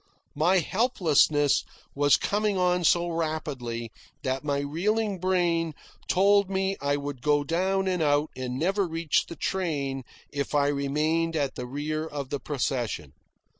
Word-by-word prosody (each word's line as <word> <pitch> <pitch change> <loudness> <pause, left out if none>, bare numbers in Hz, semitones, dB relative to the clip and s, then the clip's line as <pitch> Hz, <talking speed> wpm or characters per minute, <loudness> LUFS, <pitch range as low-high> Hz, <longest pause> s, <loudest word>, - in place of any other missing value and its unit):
My 170 +6 +3
helplessness 160 - +3 0.3
was 145 0 +4
coming 205 -1 0
on 180 -1 +2
so 175 +1 +3
rapidly 140 -8 -3 0.3
that 130 +1 -1
my 145 -1 0
reeling 195 +7 -1
brain 170 -3 +1 0.3
told 200 +1 +4
me 190 0 0
I 140 0 +1
would 140 -3 -5
go 145 +1 +2
down 190 +5 0
and 180 -2 0
out 145 0 +2
and 125 -1 -4
never 190 +5 +1
reach 165 -2 0
the 170 - -8
train 145 -9 -2 0.3
if 140 0 -3
I 145 -1 +3
remained 155 +4 0
at 140 -3 0
the 125 - -6
rear 150 +4 -3
of 140 -3 -6
the 145 - -1
procession. 130 -5 -2
155 Hz, 145 wpm, -27 LUFS, 140-180 Hz, 0.3 s, was